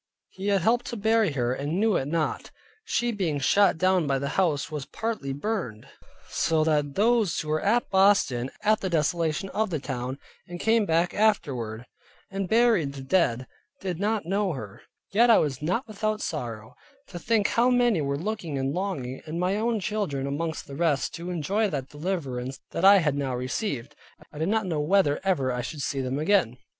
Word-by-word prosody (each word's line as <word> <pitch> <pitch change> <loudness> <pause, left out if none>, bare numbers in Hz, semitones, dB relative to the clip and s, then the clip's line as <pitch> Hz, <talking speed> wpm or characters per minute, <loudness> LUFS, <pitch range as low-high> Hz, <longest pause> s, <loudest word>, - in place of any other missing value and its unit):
he 190 +2 -6
had 200 -2 +2
helped 240 +6 +2
to 240 - -4
bury 220 -4 +2
her, 125 -2 0
and 145 +7 -2
knew 220 -2 +3
it 135 - 0
not. 155 0 -2 0.4
She 240 - 0
being 180 -9 -1
shot 195 +7 +3
down 185 -2 +2
by 135 -1 +1
the 140 +1 -3
house 160 -6 0
was 150 -3 -5
partly 220 -12 -3
burnt, 145 - -3 0.4
so 160 -1 +1
that 150 -3 0
those 220 -3 +2
who 155 - -5
were 155 0 +1
at 235 +4 +2
Boston 190 -11 +3
at 215 0 +3
the 190 - -1
desolation 165 +2 0
of 215 +1 -1
the 165 - -1
town, 130 -1 -4 0.3
and 175 0 -7
came 225 0 +2
back 165 +2 +2
afterward, 125 - 0 0.5
and 195 -2 -3
buried 220 -11 +3
the 135 -1 -8
dead, 130 -6 +1 0.3
did 180 -3 -4
not 210 -1 0
know 195 0 0
her. 105 -8 -8 0.3
Yet 235 +4 +4
I 230 - +8
was 140 -3 0
not 185 - -1
without 215 0 -2
sorrow, 115 - -5 0.4
to 175 - -7
think 215 +2 +1
how 240 +2 +3
many 245 -8 +3
were 140 0 -1
looking 175 -4 -3
and 135 +1 -1
longing, 150 -9 -3
and 160 +2 -4
my 180 +2 +1
own 225 +1 0
children 190 -9 -2
amongst 160 +3 -3
the 140 - -9
rest, 155 -2 0
to 170 +2 -6
enjoy 195 +6 0
that 140 -5 -4
deliverance 140 -6 -4
that - - -3
I 200 +1 +9
had 155 -6 +2
now 135 -3 -2
received, 130 - -3 0.3
and - - -19
I 150 - -8
did 160 +4 0
not 220 -1 +1
know 165 -5 -1
whether 150 -1 +2
ever 140 -10 +1
I 125 0 -2
should 145 +3 -5
see 135 0 -1
them 130 +1 -2
again. 155 - +2
170 Hz, 195 wpm, -26 LUFS, 140-205 Hz, 0.5 s, I